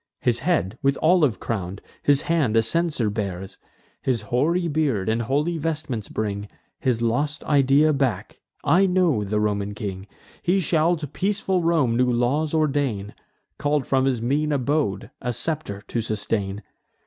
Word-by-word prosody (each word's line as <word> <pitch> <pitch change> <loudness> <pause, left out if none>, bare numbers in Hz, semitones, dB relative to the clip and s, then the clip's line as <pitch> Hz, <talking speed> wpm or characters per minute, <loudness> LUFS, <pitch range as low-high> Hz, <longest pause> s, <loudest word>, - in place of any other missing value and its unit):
His 120 -1 +2
head 125 - 0
with 140 0 +2
olive 155 - +3
crown'd, 95 -3 -4 0.2
his 145 -1 +3
hand 150 -10 +1
a 115 - +5
censer 155 -1 +1
bears, 95 -3 -5 0.4
His 120 -5 0
hoary 155 - +1
beard 145 - 0
and 110 +1 +1
holy 150 +8 0
vestments 150 -8 -3
bring 105 -1 -3 0.3
His 120 -3 0
lost 145 +7 0
idea 145 +2 +4
back: 130 -9 -2 0.2
I 190 +3 +4
know 180 - +2
the 105 +1 -1
Roman 105 -1 -1
king. 100 -2 -5 0.3
He 180 +3 +2
shall 165 0 +2
to 155 - -5
peaceful 190 +4 -1
Rome 160 -8 +2
new 125 +1 +3
laws 130 +6 +1
ordain, 140 -10 0 0.5
Call'd 145 -1 +1
from 135 -1 +2
his 125 -4 0
mean 150 +5 +1
abode 140 -7 0
a 125 0 -2
scepter 145 -8 -2
to 115 - -1
sustain. 105 -2 -2
130 Hz, 150 wpm, -23 LUFS, 110-155 Hz, 0.5 s, a